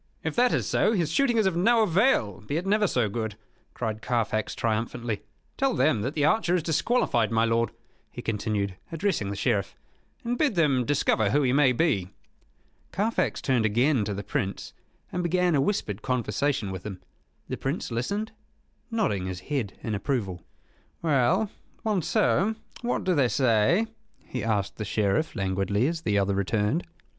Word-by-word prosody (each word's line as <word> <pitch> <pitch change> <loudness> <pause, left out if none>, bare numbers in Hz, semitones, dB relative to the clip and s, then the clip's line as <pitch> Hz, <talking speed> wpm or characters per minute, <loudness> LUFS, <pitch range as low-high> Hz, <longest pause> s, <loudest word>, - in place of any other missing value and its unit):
"If 160 - -2
that 245 0 +4
is - - +1
so, 220 - +2
his 170 -7 0
shooting 245 +2 +2
is 220 - +3
of 190 -3 +1
no 225 +6 +4
avail, 170 - +2
be 125 +9 -3
it 175 - -3
never 210 +1 +3
so 125 -9 +1
good," 110 0 -3 0.4
cried 110 -2 -3
Carfax, 115 -3 -1
triumphantly. 115 0 -2 0.4
"Tell 270 -2 +1
them 120 -9 +2
that 130 +7 -3
the 145 -2 +2
archer 180 -1 +3
is 175 - 0
disqualified, 155 - +1
my 115 0 +3
lord," 115 0 +1 0.4
he 120 - -8
continued, 105 -3 -1 0.2
addressing 165 - -1
the 100 - -3
Sheriff; 100 -2 0 0.5
"and 240 +1 -2
bid 285 -9 +2
them 140 -7 +3
discover 115 -6 +2
who 145 +7 +2
he 125 -1 +2
may 140 -2 +5
be." 120 - +1 0.8
Carfax 210 +6 0
turned 130 -4 +2
again 120 +4 +2
to 100 0 -3
the 100 - -5
Prince, 100 0 -3 0.4
and 180 - -1
began 180 0 +2
a 140 - +3
whispered 125 - -1
conversation 125 -2 -1
with 95 -1 -6
him. 100 -3 -6 0.5
The - - -4
Prince - - -3
listened, 200 - -2 0.6
nodding 190 - 0
his 90 -1 -5
head 125 -3 -3
in 110 - -2
approval. 100 -5 -2 0.6
"Well, 165 - +2 0.3
Monceux, 210 +1 +2 0.3
what 240 0 -1
do 185 - +2
they 140 -6 +3
say?" 125 - +3 0.3
he 125 - -6
asked 105 -3 -1
the 110 - -3
Sheriff, 105 +8 0
languidly, 95 +3 0
as 165 +2 -1
the 105 -8 +1
other 100 0 +2
returned. 105 - 0
125 Hz, 170 wpm, -27 LUFS, 105-175 Hz, 0.8 s, may